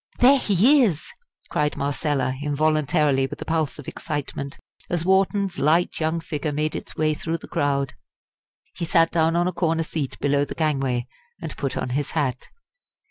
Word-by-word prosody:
"There 270 +3 +6
he 240 - +4
is!" 170 -10 -1 0.4
cried 150 0 0
Marcella, 140 -2 0
involuntarily, 150 -1 +2
with - - -8
a - - -6
pulse 160 -2 -1
of 145 - -10
excitement, 140 -1 -5 0.3
as 170 -1 -1
Wharton's 190 0 +2
light 165 +4 +2
young 160 +1 0
figure 150 -2 -3
made 150 +1 -1
its - - -6
way 155 0 +1
through 165 +2 -3
the - - -12
crowd. 140 -1 0 0.8
He 170 - -4
sat 165 0 +3
down 165 0 +2
on 175 +1 +2
a 180 - -1
corner 165 -1 +1
seat 155 -4 -4
below 145 0 +2
the - - -5
gangway 135 -6 0 0.3
and - - -6
put 140 -2 -3
on - - -2
his 140 +3 -2
hat. 135 -4 -1
155 Hz, 170 wpm, -24 LUFS, 140-165 Hz, 0.8 s, There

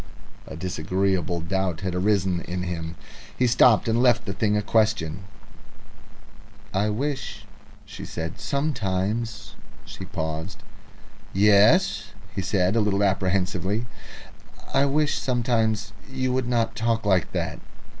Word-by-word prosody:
A - - -7
disagreeable 90 +1 -1
doubt 95 0 -1
had 95 -2 -2
arisen 95 -2 +1
in 90 0 -4
him. 85 -2 -4 0.4
He 125 - +3
stopped, 120 -2 +5
and 115 +1 +2
left 120 -2 +3
the 100 - -3
thing 105 +1 +1
a 105 - 0
question. 105 -5 +1 1.5
"I 100 +3 +1
wish," 135 +5 -3 0.4
she - - -9
said, 80 -1 -5
"sometimes 110 -3 -2 0.2
" - - -23
She 95 - -8
paused. 80 +1 -5 0.7
"Yes," 105 - +4 0.3
said 95 0 +1
he, 115 - +2
a - - +3
little 100 -1 +1
apprehensively. 95 +3 0 0.9
"I 140 +1 +4
wish 150 +1 +1
sometimes 115 -4 0 0.2
you 130 -1 -1
would 130 -1 0
not 115 -2 0
talk 115 0 0
like 95 -4 +2
that." - - -2
100 Hz, 125 wpm, -25 LUFS, 95-115 Hz, 1.5 s, stopped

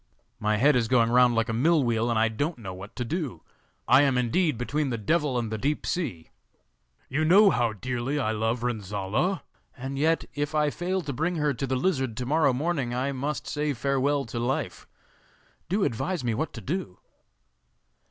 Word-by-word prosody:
My 105 0 +1
head 140 +5 +4
is 120 -3 +2
going 115 -1 +3
round 125 -1 +5
like 115 +1 +1
a 115 - -2
mill 150 +6 +3
wheel, 115 -1 +1
and 115 - +1
I 110 +1 +4
don't 145 +10 -2
know 95 -6 -7
what 95 +3 -10
to 125 - -3
do. 145 - -4 0.4
I - - +7
am 135 -3 +3
indeed 130 +4 +1
between 145 +4 -1
the 120 - -2
Devil 145 +4 0
and 115 -2 -2
the 110 - -3
Deep 145 +6 -1
Sea. 125 - -3 0.8
You 150 +4 -1
know 195 +5 +6
how 120 -5 +1
dearly 125 +5 -3
I 130 -7 0
love 110 +2 -1
Renzolla, 110 - -1 0.3
and 135 +2 -5
yet, 160 +2 +2
if 145 +1 -2
I 150 -1 +2
fail 185 +4 -2
to 145 -2 -4
bring 160 +7 -1
her 150 -2 +1
to 135 +2 -3
the 130 - 0
lizard 130 -6 0
to 125 - -3
morrow 150 +1 +3
morning, 135 -3 -1
I 130 +3 -1
must 140 0 -3
say 150 0 -1
farewell 140 +2 0
to 115 +1 -5
life. 125 +3 -2 0.8
Do 195 +3 +1
advise 135 +7 -1
me 120 -2 0
what 150 +8 -2
to 115 - -7
do. 140 - -4
130 Hz, 195 wpm, -27 LUFS, 115-150 Hz, 0.8 s, I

